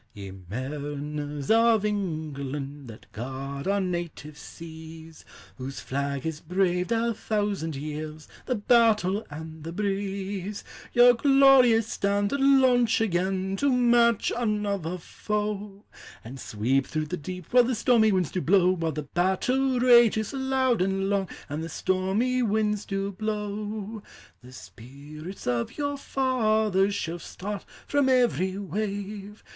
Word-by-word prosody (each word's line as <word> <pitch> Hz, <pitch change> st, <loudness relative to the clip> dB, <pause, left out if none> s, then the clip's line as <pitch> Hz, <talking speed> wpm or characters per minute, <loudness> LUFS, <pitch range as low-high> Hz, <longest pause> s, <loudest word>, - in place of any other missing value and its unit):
Ye 100 Hz, -2 st, -8 dB
mariners 145 Hz, -, -5 dB
of 225 Hz, -2 st, +4 dB
England! 145 Hz, -8 st, -4 dB
That 110 Hz, -2 st, -13 dB
guard 135 Hz, -, -6 dB
our 200 Hz, +1 st, +2 dB
native 175 Hz, -5 st, -4 dB
seas; 160 Hz, +1 st, -11 dB, 0.4 s
Whose 135 Hz, +1 st, -6 dB
flag 140 Hz, 0 st, -3 dB
has 160 Hz, -2 st, -3 dB
braved, 180 Hz, +3 st, 0 dB
a 230 Hz, 0 st, +1 dB
thousand 205 Hz, -8 st, -2 dB
years, 155 Hz, +2 st, -6 dB, 0.2 s
The 255 Hz, -, +1 dB
battle 215 Hz, -3 st, +3 dB
and 160 Hz, +1 st, -9 dB
the 165 Hz, -, -6 dB
breeze! 195 Hz, 0 st, -3 dB, 0.3 s
Your 245 Hz, 0 st, +7 dB
glorious 260 Hz, -3 st, +5 dB
standard 200 Hz, +5 st, 0 dB
launch 260 Hz, -4 st, +4 dB
again 190 Hz, -1 st, 0 dB
To 280 Hz, +4 st, +2 dB
match 240 Hz, -2 st, +3 dB
another 205 Hz, -6 st, -1 dB
foe! 210 Hz, +2 st, -4 dB, 0.4 s
And 130 Hz, +4 st, -9 dB
sweep 125 Hz, +5 st, 0 dB
through 155 Hz, 0 st, -2 dB
the 175 Hz, -, -4 dB
deep, 180 Hz, +4 st, -8 dB
While 250 Hz, -1 st, +7 dB
the 250 Hz, 0 st, 0 dB
stormy 220 Hz, -2 st, +4 dB
winds 185 Hz, -5 st, 0 dB
do 185 Hz, -, -2 dB
blow; 185 Hz, +1 st, +4 dB
Wliile 165 Hz, -4 st, -2 dB
the 150 Hz, -, -3 dB
battle 245 Hz, -, +1 dB
rages 235 Hz, -3 st, +5 dB
loud 265 Hz, -4 st, +1 dB
and 195 Hz, +1 st, 0 dB
long, 195 Hz, -3 st, 0 dB, 0.2 s
And 150 Hz, +3 st, -4 dB
the 165 Hz, -, -5 dB
stormy 190 Hz, +10 st, 0 dB
winds 210 Hz, -2 st, 0 dB
do 195 Hz, 0 st, -2 dB
blow. 210 Hz, +1 st, -4 dB, 0.4 s
The 125 Hz, +1 st, -14 dB
spirits 145 Hz, -, -11 dB
of 120 Hz, -1 st, -2 dB
your 285 Hz, -1 st, -1 dB
fathers 220 Hz, -8 st, +1 dB
Shall 170 Hz, +1 st, -3 dB
start 200 Hz, +4 st, -6 dB, 0.2 s
from 285 Hz, -2 st, +2 dB
every 235 Hz, -7 st, +2 dB
wave! 205 Hz, +1 st, -5 dB
195 Hz, 130 wpm, -26 LUFS, 155-220 Hz, 0.4 s, Your